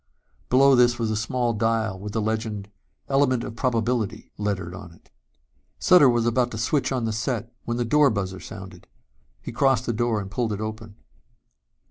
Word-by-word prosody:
Below 135 +2 +5
this 120 -1 +4
was 115 -2 -1
a - - -1
small 120 +2 -1
dial 110 -2 0
with 105 +1 -7
the 110 - 0
legend 110 -2 -3 0.4
Element 135 -3 +2
of 115 - -7
Probability 115 -3 -1
lettered 100 -4 -3
on 85 -1 -10
it. - - -24 0.7
Sutter 175 -7 +6
was 120 -1 +1
about 120 +1 +2
to 110 - -7
switch 135 +6 0
on 125 -3 -1
the 110 - -1
set 115 +1 -3
when 120 0 -2
the 120 - 0
door 150 +4 +4
buzzer 95 -3 -3
sounded. 95 -3 -10 0.6
He - - -6
crossed 135 +2 +2
to - - 0
the 110 - -5
door 120 -2 +1
and 100 -1 -7
pulled 110 0 -1
it 100 - -4
open. 110 -1 -6
115 Hz, 185 wpm, -24 LUFS, 105-125 Hz, 0.7 s, Sutter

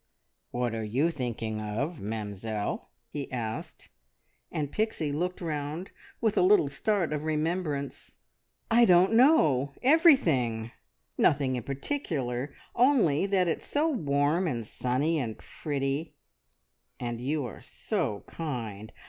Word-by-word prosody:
"What 120 -1 -1
are 110 -1 -3
you 130 +10 +1
thinking 115 -6 -3
of, 130 +10 -3
Mamzelle?" 105 0 -4 0.2
he 145 -2 -5
asked; 115 -3 -5 0.6
and 145 -2 -2
Pixie 215 -9 -1
looked 180 +6 -2
round 155 +2 -4 0.3
with 220 -3 +1
a - - +5
little 185 -5 +5
start 185 +1 0
of 150 0 -2
remembrance. 155 -2 -2 0.6
"I 235 +1 +6
don't 185 +1 +5
know. 155 - +4
Everything. 165 - +4 0.5
Nothing 135 -3 +3
in 125 - -2
particular, 140 - -3 0.2
only 235 - +4
that 190 -2 +2
it's 165 - -2
so 300 +3 +1
warm 155 - +1
and 120 -7 -2
sunny 135 +8 0
and 115 -5 -3
pretty; 140 +1 -3 0.8
and 120 -1 -4
you 145 +2 -1
are 115 - -8
so 135 - -3
kind. 115 -9 -5
145 Hz, 125 wpm, -29 LUFS, 120-180 Hz, 0.8 s, I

